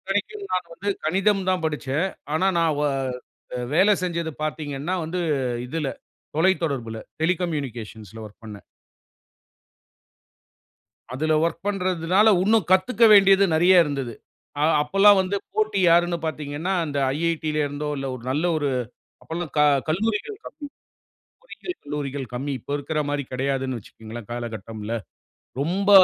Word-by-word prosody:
இத்தனைக்கும் 205 - -3
நான் 180 -2 -1
வந்து 200 - -5 0.2
கணிதம் 195 +3 +2
தான் 185 -3 0
படிச்சேன். 150 +2 -1 0.3
ஆனா, 185 +4 +2
நான் 165 -2 +3
ஓ - - +2 0.9
வேல 195 +5 +5
செஞ்சது 170 -2 -2
பார்த்தீங்கன்னா 150 +1 -3
வந்து 180 +3 -3 0.5
இதுல 150 +1 -2 0.5
தொலைத்தொடர்புல 145 -10 +1 0.2
டெலிகம்யூனிகேஷன்ஸ்ல 130 - -3
வொர்க் 105 +2 -14
பண்ணேன். 105 -2 -10 2.5
அதுல 155 +3 +1
வொர்க் 170 +2 -2
பண்றதுனால 185 +1 +2
உன்னும் 215 -3 +2
கத்துக்க 215 +5 +4
வேண்டியது 195 -1 +7
நெறைய 175 +2 +6
இருந்தது. 135 -5 -3 0.5
அ - - +1 0.2
அப்போல்லாம் 195 +6 +5
வந்து 190 +2 -1 0.2
போட்டி 215 -2 +1
யாருனு 175 +1 +4
பார்த்தீங்கன்னா, 155 +3 -3
அந்த 145 -2 -3 0.2
"IIT" 165 -1 -1
ல - - 0
இருந்தோ 145 +1 -4
இல்ல 135 0 -4
ஒரு 125 - -9
நல்ல 150 +5 0
ஒரு, 145 -2 0 0.5
அப்போல்லாம் 165 -2 -5
க 150 - +5 0.3
கல்லூரிகள் 220 - -1
கம்மி. - - -9 0.9
பொறியியல் 360 -7 -7
கல்லூரிகள் 145 -2 -4
கம்மி. 140 +3 -3
இப்போ 140 - -7
இருக்கிற 150 +2 -2
மாதிரி 145 -1 -1
கிடையாதுனு 130 -1 -1
வச்சுக்கோங்களேன் 110 +1 -10
காலகட்டம்ல. 115 -2 -5 0.7
ரொம்ப 190 +7 0
160 Hz, 125 wpm, -24 LUFS, 140-185 Hz, 2.5 s, வேண்டியது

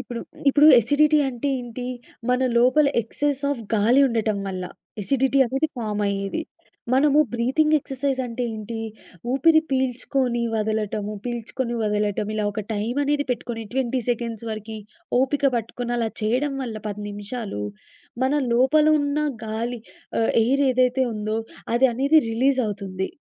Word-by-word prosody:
ఇప్పుడు 240 -1 -6 0.3
ఇప్పుడు 295 +2 +6
ఎసిడిటీ 300 +6 +3
అంటే 260 +2 -3
ఏంటి? 245 +1 -6 0.4
మన 250 +1 +2 0.2
లోపల 255 +5 +4
ఎక్సెస్ 280 +5 -2
ఆఫ్ 275 -5 -2
గాలి 230 +6 +4
ఉండటం 220 -3 0
వల్ల. 185 -1 -4 0.4
ఎసిడిటీ 270 +5 +2
అనేది 270 +6 0
ఫార్మ్ 210 -3 -2
అయ్యేది. 200 +9 -2 0.5
మనము 285 +2 +4 0.2
బ్రీతింగ్ 285 +6 +2
ఎక్సర్సైజ్ 270 -1 -2
అంటే 245 +1 -3
ఏంటి? 220 +1 -6 0.5
ఊపిరి 315 +4 +5
పీల్చుకొని 255 -1 0
వదలటము, 215 -1 -1
పీల్చుకొని 240 +1 -3
వదలటం. 210 -1 0
ఇలా 215 - -1
ఒక 215 +1 -3
టైం 215 +4 -2
అనేది 290 0 +1
పెట్టుకొని 235 -1 -3
20 260 -1 0
సెకండ్స్ 230 -2 -2
వరకి 215 0 -6 0.4
ఓపిక 280 +2 0
పట్టుకొని 235 +1 -4
అలా 225 -1 0
చేయడం 255 +6 0
వల్ల 230 -3 -5
10 210 0 -5
నిమిషాలు 205 - -5 0.6
మన 265 - +1 0.2
లోపల 265 +6 +4
ఉన్న 285 +1 -1 0.3
గాలి 230 +2 -3 0.4
ఆహ్, 225 - +2
ఎయిర్ 275 +4 +2
ఏదైతే 255 +1 +2
ఉందో 215 +1 -2 0.4
అది 265 +2 +5
అనేది 280 +5 +4
రిలీజవుతుంది. 215 -7 0
240 Hz, 135 wpm, -23 LUFS, 215-270 Hz, 0.6 s, ఇప్పుడు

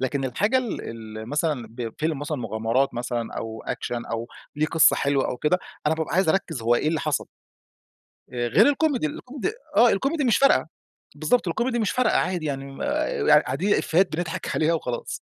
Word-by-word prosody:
لكن 135 +1 -1
الحاجة 205 - +1
ال 245 -5 -3 0.4
ال 110 +1 -7
مثلًا 150 -5 -1
بفيلم 125 +6 -3
مثلًا 150 0 -3
مغامرات 115 +3 0
مثلًا 120 -1 -3
أو 110 0 -6
أكشن 120 -1 -3
أو 115 +1 -4 0.3
ليه 155 +1 +1
قصّة 165 -1 +5
حلوة 140 -1 +1
أو 125 - -3
كده، 165 +7 +1 0.3
أنا 160 - +3
بابقى 160 0 -3
عايز 190 -1 +3
أركز 160 -9 0
هو 120 +1 +3
إيه 150 - +1
اللي 160 0 0
حصل. 150 -2 -1 1.1
آآ 120 -1 -1
غير 115 - +5
الكوميدي، 285 - +1
الكوميدي 260 - -4 0.2
آه، 240 - +7
الكوميدي 275 +9 0
مش 235 -4 +3
فارقة. 215 - +4 0.5
بالضبط، 165 +8 +1
الكوميدي 235 +7 0
مش 215 - +1
فارقة، 250 -3 +2
عادي 175 -4 -1
يعني 135 -1 -5
آآ، 310 +11 -1
قاع - - +8
قاعدين 205 +2 0
إيفيهات 175 0 +2
بنضحك 170 -1 -3
عليها 160 +1 +2
وخلاص. 125 -7 -3
155 Hz, 180 wpm, -24 LUFS, 125-210 Hz, 1.1 s, قاع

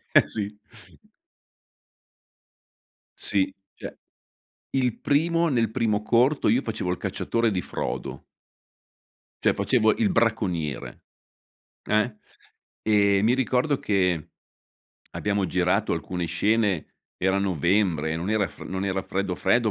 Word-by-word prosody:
Eh, - - +7
sì. 105 -1 -3 2.6
Sì, 95 -1 0 0.2
cioè, - - -8 0.8
il 125 -4 0
primo 165 +3 +2
nel 115 -7 +1
primo 110 -3 0
corto 125 +6 +3
io 120 +5 +3
facevo 105 -7 -3
il 90 - -2
cacciatore 115 0 0
di 95 -4 -1
Frodo - - -5 1.2
cioè, - - +5
facevo 110 -4 +2
il 225 -3 +2
bracconiere. 95 - -1 0.8
Eh. 110 +1 +1 0.7
E, 100 -2 +3
mi 115 +3 +4
ricordo 130 +2 +1
che 90 -6 0 0.8
abbiamo 100 -2 -1
girato 90 +4 +1
alcune 85 +1 -3
scene, 105 -2 0 0.2
era 95 +1 +1
novembre, 90 -3 +1
non 85 +4 -4
era 105 -3 +1
fre - - -11
non 95 +1 -3
era 95 -1 -1
freddo 95 -1 -2
freddo, 120 -2 +2
105 Hz, 115 wpm, -25 LUFS, 95-115 Hz, 2.6 s, Eh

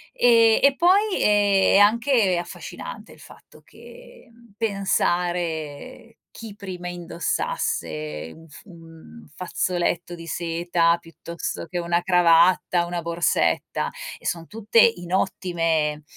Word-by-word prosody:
E 230 -2 +5
e, 280 0 +4
poi, 385 +6 +3
eh, 205 -2 +3
è - - +7
anche 220 -3 +3
affascinante 175 - -8
il - - -19
fatto - - -17
che, - - -16
mhmm, 235 -2 -22
pensare 175 - -2
chi 225 -3 -10
prima 185 -3 -8
indossasse 80 - -4
un 165 0 -16
f 150 - -14
un 165 - -15
fazzoletto 175 -1 -2
di 165 0 -11
seta, 170 0 0
piuttosto 170 0 -7
che 175 +2 -5
una 170 0 -1
cravatta, 175 0 +3
una 175 0 -4
borsetta. 170 0 0 0.3
E - - -20
son 165 -1 -3
tutte 225 +1 0
in 175 -6 +1
ottime 165 -5 -1
175 Hz, 120 wpm, -23 LUFS, 165-205 Hz, 0.3 s, è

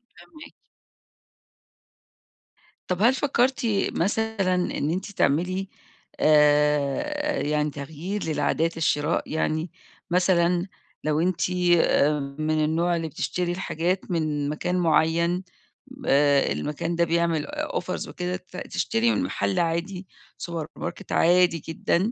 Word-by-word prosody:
فاهماكِ. 240 - -14 2.3
طَب 180 +1 -2
هل 235 +4 +5
فكّرتِ 265 -2 +1 0.3
مثلًا 205 0 0
إن 180 -4 -1
أنتِ 190 +4 -3
تعملي 185 +4 0 0.5
آآ، 150 - +3
يعني 150 0 0
تغيير 160 +8 -5
للعادات 160 +1 0
الشراء 155 0 0
يعني؟ 160 +1 -1 0.4
مثلًا 180 0 +2 0.4
لو 150 0 +1
أنتِ 180 +1 0 0.3
آآ 150 -2 +3 0.2
من 155 0 +1
النوع 170 +3 +1
اللي 165 -1 -2
بتشتري 175 +3 -2
الحاجات 180 +1 -2
من 150 -3 -1
مكان 180 +4 -2
معيّن، 170 +1 +2 0.6
آآ، 140 0 +4
المكان 165 +3 -2
ده 170 - +2
بيعمل 170 -2 +1
آآ - - -3
offers - - -4
وكده، 180 0 -4
ت 180 0 -10
تشتري 230 +1 0
من 270 - 0
مَحَل 195 -8 -1
عادي 175 +3 -2 0.3
سوبر 165 -3 -5
ماركت 200 - -6
عادي 175 0 +4
جدًا، 170 +6 0
170 Hz, 115 wpm, -25 LUFS, 155-185 Hz, 2.3 s, هل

